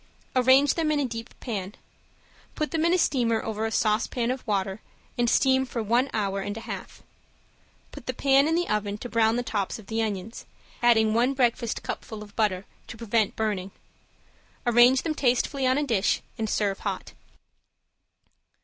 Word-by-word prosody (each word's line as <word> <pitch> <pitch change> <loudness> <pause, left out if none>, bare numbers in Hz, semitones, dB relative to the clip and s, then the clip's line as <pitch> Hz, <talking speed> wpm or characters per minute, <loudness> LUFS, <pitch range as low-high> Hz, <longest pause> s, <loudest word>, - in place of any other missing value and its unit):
Arrange 260 +3 +5
them 320 -2 0
in 300 - +1
a 285 - +1
deep 230 -1 -6
pan. 205 -4 -4 0.8
Put 305 - -2
them 320 -1 0
in 340 - +3
a - - +3
steamer 235 -9 +1
over 220 0 -2
a - - -5
saucepan 230 +3 +1
of 255 0 -4
water 195 -1 -1 0.3
and 240 -1 +1
steam 265 +1 +3
for 245 -3 -4
one 240 +5 +2
hour 200 -2 -1
and 205 +2 -4
a - - -6
half. - - -8 0.9
Put - - -11
the - - -1
pan 275 +1 +4
in 325 - +1
the 350 +1 0
oven 205 -1 -1
to 245 - -7
brown 225 -1 +3
the 245 - -1
tops 205 -4 -2
of 220 - -13
the 225 +3 -2
onions, 215 0 -4 0.3
adding 220 -2 +4
one 245 +4 +2
breakfast 240 -3 0
cupful 215 -1 -6
of 205 -1 -15
butter 200 -4 0 0.2
to 225 - -9
prevent 225 -2 0
burning. 205 -4 -2 1.0
Arrange 240 +2 +5
them 320 - -1
tastefully 265 0 +1
on 260 +1 +3
a 295 - +1
dish, 210 -7 +1
and 220 -1 -3
serve 200 -2 0
hot. - - -4
230 Hz, 175 wpm, -26 LUFS, 210-260 Hz, 1.0 s, Arrange